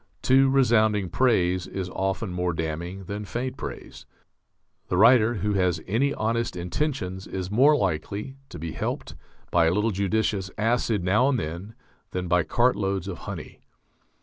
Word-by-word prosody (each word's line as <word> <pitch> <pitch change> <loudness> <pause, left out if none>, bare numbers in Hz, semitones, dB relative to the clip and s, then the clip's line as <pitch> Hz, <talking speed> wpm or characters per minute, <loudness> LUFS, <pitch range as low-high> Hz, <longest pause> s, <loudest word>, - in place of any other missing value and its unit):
Too 135 +1 +5
resounding 110 -7 +3
praise 90 -7 +2
is 95 -2 -4
often 95 +1 -2
more 90 0 -1
damning 80 +4 -4
than 100 +2 -5
faint 125 +5 -4
praise. - - -8 0.8
The 90 - -1
writer 115 +2 +6
who 105 +1 -1
has 90 -4 +1
any 125 +8 +1
honest 115 -1 -1
intentions 95 - -3
is 95 0 -5
more 135 +8 +5
likely 100 - -2
to - - -8
be 80 +1 -5
helped - - -4 0.4
by 85 -2 +4
a - - +3
little 105 +5 +1
judicious 100 0 0
acid 110 -2 +1
now 105 +9 +3
and 135 - +1
then 90 +5 -6 0.4
than 90 -1 -2
by 90 +1 +3
cartloads 100 -5 0
of 95 -3 -5
honey. - - -7
100 Hz, 150 wpm, -25 LUFS, 90-115 Hz, 0.8 s, writer